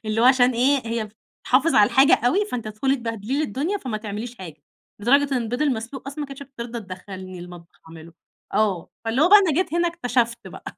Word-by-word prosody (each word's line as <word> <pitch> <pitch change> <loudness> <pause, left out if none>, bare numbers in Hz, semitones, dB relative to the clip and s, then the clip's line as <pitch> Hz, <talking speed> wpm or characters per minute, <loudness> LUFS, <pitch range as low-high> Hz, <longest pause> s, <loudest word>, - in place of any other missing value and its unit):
اللي 215 +1 -1
هو - - +4
عشان 255 -1 +5
إيه 255 +1 +2
هي 225 -1 -2 0.4
تحافظ 280 +6 +3
على 205 0 +5
الحاجة 280 +7 +6
أوي 380 +12 +2
فأنتِ 245 - -5
هتدخلي 240 +6 0
تبهدلي 230 +1 -3
لي 310 - +1
الدنيا 305 - -2
فما 255 - -4
تعمليش 215 +3 -6
حاجة، 160 -5 -10 0.4
لدرجة 275 +5 +3
إن 245 - 0
البيض 245 +5 -2
المسلوق 260 -1 -3
أصلًا 285 +2 -7
ما 295 - -3
كانتش 275 0 -9
بترضى 240 -3 -7
تدخلني 185 -1 -9
المطبخ 175 -1 -12
أعمله، 165 0 -12 0.4
آه، 200 -6 0
فاللي 230 +5 +1
هو 335 - +5
بقى 415 +2 +9
أنا 380 -6 +2
جيت 345 0 0
هنا 345 0 +2
اكتشفت 240 - -1
بقى. - - -12
240 Hz, 205 wpm, -23 LUFS, 215-280 Hz, 0.4 s, بقى